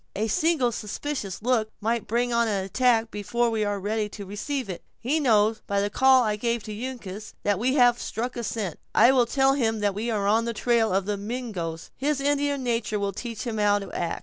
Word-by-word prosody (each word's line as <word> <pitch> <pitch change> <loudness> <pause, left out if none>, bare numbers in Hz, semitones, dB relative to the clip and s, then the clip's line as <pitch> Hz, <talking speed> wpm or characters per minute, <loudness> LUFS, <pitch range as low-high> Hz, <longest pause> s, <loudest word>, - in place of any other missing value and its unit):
A 215 +3 0
single 305 -1 +2
suspicious 215 -2 -4
look 235 -3 +1
might 230 +1 -1
bring 240 +2 0
on 235 0 +3
an 200 -3 -1
attack 230 +2 +2
before 235 +3 0
we 220 -1 0
are 205 -1 -1
ready 210 +2 -1
to 200 0 -8
receive 230 +7 -3
it. 185 -3 -6 0.2
He 285 +7 0
knows, 220 -5 +3
by 200 0 +1
the 205 +1 -1
call 260 +2 +5
I 210 -2 0
gave 235 0 -1
to 215 - -7
Uncas, 215 -3 -7
that 205 -2 +1
we 255 +4 +1
have 245 -3 +5
struck 245 +3 -3
a 240 - -4
scent; 210 -7 -3 0.2
I 235 +4 +7
will 250 -3 +3
tell 270 +2 +3
him 225 -5 0
that 205 -1 +1
we 220 +4 -3
are 210 -3 0
on 220 +3 +3
the 235 - -2
trail 230 -2 +2
of 190 0 +1
the 205 0 -1
Mingoes; 200 -7 -5
his 285 +1 0
Indian 285 -1 0
nature 230 -3 -1
will 200 -1 -1
teach 230 +3 -5
him 225 -3 -3
how 205 -1 +4
to 200 -2 -6
act." 170 -1 -2
225 Hz, 225 wpm, -26 LUFS, 205-245 Hz, 0.2 s, I